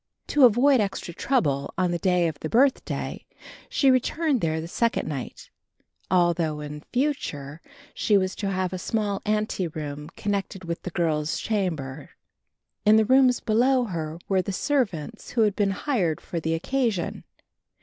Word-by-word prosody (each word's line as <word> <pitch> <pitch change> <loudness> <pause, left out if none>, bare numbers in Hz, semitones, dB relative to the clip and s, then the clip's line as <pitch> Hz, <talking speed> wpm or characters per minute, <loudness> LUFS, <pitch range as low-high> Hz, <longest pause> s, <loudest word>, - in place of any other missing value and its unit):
To 290 -3 +6
avoid 250 +4 +5
extra 195 -3 -3
trouble 145 - 0
on 180 -1 +1
the 175 - -1
day 180 -1 +2
of 155 -3 -5
the 155 - -4
birthday, 265 - +1 0.5
she 275 -2 +4
returned 270 +1 +1
there 160 -1 0
the 160 - -5
second 230 +6 0
night, 140 -5 -6 0.6
although 170 -4 +2
in 150 0 -7
future 165 - -2 0.3
she 210 - +3
was 185 0 0
to 200 - -2
have 185 -1 -1
a 185 - -3
small 205 0 -1
ante 210 -3 0
room 150 -1 -6
connecting 200 -2 -3
with 170 0 -4
the - - -5
girls' 160 -3 0
chamber. 165 -11 -2 0.7
In 210 +1 +6
the 220 0 +5
rooms 255 +1 +4
below 250 +4 +3
her 165 -7 -4
were 190 -1 +2
the 195 - -4
servants 220 - -1
who 235 - 0
had 210 -2 +3
been 205 -2 +2
hired 195 - 0
for 170 - -5
the 160 0 -1
occasion. 215 +1 -1
190 Hz, 160 wpm, -25 LUFS, 160-230 Hz, 0.7 s, To